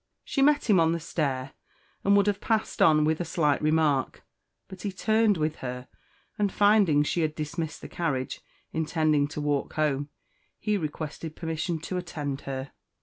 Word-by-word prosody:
She 275 - -1
met 290 0 +4
him 200 -5 +5
on 165 0 +3
the 170 - -1
stair, 135 -5 -2 0.5
and 200 +1 +5
would 200 - +4
have 205 -1 0
passed 220 -1 -1
on 155 -1 +5
with 160 +2 +1
a - - +1
slight 155 -3 +1
remark, 150 -3 +1 0.4
but 190 - -10
he 205 - -2
turned 215 +1 +2
with 155 0 -1
her, 125 0 -6 0.5
and 205 -2 +2
finding 205 -8 +4
she 170 +3 0
had 155 -1 -1
dismissed 160 +1 -4
the - - -7
carriage, 140 -7 -2 0.3
intending 155 -2 +1
to 150 - -6
walk 145 -1 -1
home, 145 -2 0 0.5
he 210 -1 0
requested 155 -2 -4
permission 165 +1 -2
to 180 +3 -4
attend 145 -6 -4
her. 135 0 -4
160 Hz, 170 wpm, -27 LUFS, 150-185 Hz, 0.5 s, him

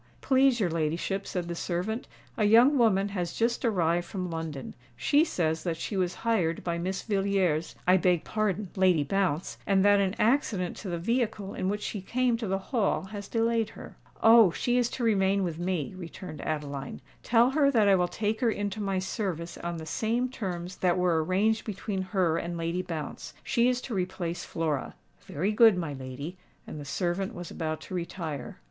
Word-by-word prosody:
"Please 265 -2 +3
your 185 -6 +1
ladyship," 165 +5 -1
said 180 -2 -3
the 170 - -3
servant, 180 +7 -3 0.3
"a - - +1
young 235 +7 +6
woman 205 -4 +3
has 180 -4 -3
just 235 +2 0
arrived 175 -6 +1
from 185 -3 -4
London. 160 -4 -5 0.2
She 285 - +4
says 160 - -1
that 170 -3 -2
she 200 - -4
was 180 -2 0
hired 180 -8 +1
by 170 -1 -2
Miss 185 +2 -3
Villiers—I 190 -4 +1
beg 180 -2 +2
pardon 210 -3 -1
Lady 185 -5 +4
Bounce—and 190 +3 0
that 205 0 +6
an 195 0 +1
accident 215 -7 +1
to 200 - -6
the 170 - -2
vehicle 215 0 -1
in 185 - -2
which 210 +1 -2
she 205 - -4
came 245 +4 +1
to 225 -2 -4
the 195 +1 0 0.2
Hall 220 -7 +1
has 205 -2 -6
delayed 230 -1 +1
her." - - -11 0.3
"Oh! 225 -3 +8
she 245 +8 -1
is 240 -1 +1
to 245 - -4
remain 200 -3 +2
with 170 -3 -3
me," 175 -5 -2
returned 175 -2 -8
Adeline. 145 -3 -4 0.2
"Tell 240 +2 +4
her 285 0 +4
that 225 -6 +3
I 200 - +6
will 180 -1 +2
take 215 +5 -2
her 240 - +3
into 205 -1 -2
my 195 -2 -1
service 185 -3 -3
on 170 0 -4
the 160 - -7
same 230 +9 0
terms 180 -7 -5
that 180 -1 +2
were 175 -3 +2
arranged 210 +6 +1
between 200 -2 -3
her 185 -4 +1
and 170 0 -4
Lady 170 +2 -1
Bounce. 160 -4 -6
She 240 +1 +2
is 250 0 0
to 245 - -6
replace 180 -2 -3
Flora." 155 -4 -2 0.3
"Very 185 +8 -1
good, 220 -2 +6
my 165 -5 -3
lady;"—and 140 +5 -9
the 145 - -7
servant 185 +8 -2
was 175 -2 -7
about 155 -1 -3
to 185 - -9
retire. 165 -6 -5
190 Hz, 185 wpm, -28 LUFS, 170-215 Hz, 0.3 s, Oh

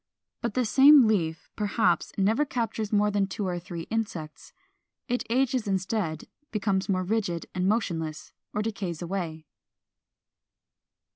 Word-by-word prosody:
But 235 -2 -2
the 255 -1 +2
same 275 +3 +8
leaf 165 -7 0
perhaps 205 -4 +1
never 215 +8 +3
captures 225 -5 -2
more 210 0 +3
than 200 -1 +1
two 200 +1 -4
or 180 -1 -2
three 175 -1 -7
insects. 180 -9 -4 0.6
It 245 -1 0
ages 250 -1 +1
instead, 190 -4 -1 0.3
becomes 200 -3 -1
more 185 -1 +1
rigid 180 -4 -1
and 185 0 0
motionless, 165 -8 -2 0.2
or 210 - -1
decays 195 -6 -4
away. 165 -3 -4
200 Hz, 130 wpm, -27 LUFS, 175-225 Hz, 0.6 s, same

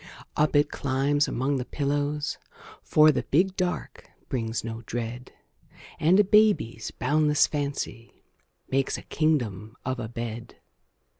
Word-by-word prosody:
Up 150 0 +2
it 145 0 +3
climbs 140 +2 +1
among 135 +3 0
the 125 - -2
pillows, 145 +2 -2 0.4
For 155 0 +5
the 140 - -1
"big 185 +6 +1
dark" 180 -2 -3 0.2
brings 115 -3 -2
no 115 0 -5
dread, 120 +2 -5 0.7
And 175 +6 +4
a - - +7
baby's 205 - +3
boundless 150 +3 +2
fancy 140 -5 -5 0.4
Makes 135 +1 0
a - - -10
kingdom 115 - -1
of 130 0 -2
a 110 -2 -4
bed. 115 0 -6
140 Hz, 130 wpm, -26 LUFS, 120-150 Hz, 0.7 s, a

